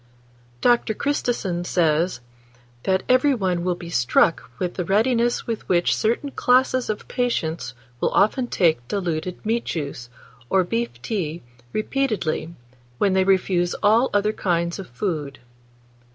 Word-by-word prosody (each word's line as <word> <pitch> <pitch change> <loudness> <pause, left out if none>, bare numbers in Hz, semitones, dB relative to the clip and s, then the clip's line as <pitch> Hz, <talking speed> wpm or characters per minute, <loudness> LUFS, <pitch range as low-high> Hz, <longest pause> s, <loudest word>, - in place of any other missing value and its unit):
DR. 240 -3 +2
CHRISTISON 235 -11 -1
says 170 -2 +1 0.6
that 190 0 +1
"every 255 +2 +4
one 185 -5 -1
will 180 0 0
be 170 -1 -9
struck 125 +5 +2
with 180 -1 -2
the 180 - -2
readiness 235 +6 +1
with 230 -2 -5
which 175 -1 +3
certain 240 +6 0
classes 255 -1 +2
of 215 - -3
patients 165 - -2 0.2
will - - +1
often 245 +5 +2
take 160 - +1
diluted 180 -1 -3
meat 230 +2 0
juice, 140 -6 -4 0.4
or 190 -1 +3
beef 230 +6 -3
tea 175 -7 -3 0.3
repeatedly, 210 -9 -1 0.4
when 195 +5 +2
they 190 0 +3
refuse 185 -2 +2
all 225 +5 +4
other 205 +1 +1
kinds 170 -2 -1
of 195 - -8
food." 145 -1 -3
190 Hz, 135 wpm, -23 LUFS, 170-230 Hz, 0.6 s, every